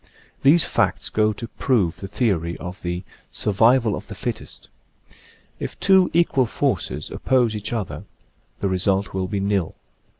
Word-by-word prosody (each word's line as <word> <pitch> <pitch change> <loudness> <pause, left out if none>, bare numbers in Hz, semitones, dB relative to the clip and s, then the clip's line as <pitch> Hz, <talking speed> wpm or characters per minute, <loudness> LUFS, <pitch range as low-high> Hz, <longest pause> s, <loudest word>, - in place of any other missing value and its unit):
These 155 +5 +5
facts - - 0
go 110 0 +2
to 115 +3 -7
prove 110 -10 0
the 95 - -7
theory 90 -6 0
of 90 +4 -8
the 90 0 -3 0.2
" - - -37
survival 115 +2 +4
of - - -8
the - - -8
fittest." - - -5 0.9
If - - -6
two 190 -2 +5
equal 160 -7 +3
forces 120 - -2
oppose 125 -4 +1
each 105 0 -4
other 110 -5 -4 0.6
the 100 - +1
result 95 +1 0
will 95 -1 -1
be 100 0 -2
nil. 100 -4 0
105 Hz, 155 wpm, -22 LUFS, 95-125 Hz, 0.9 s, These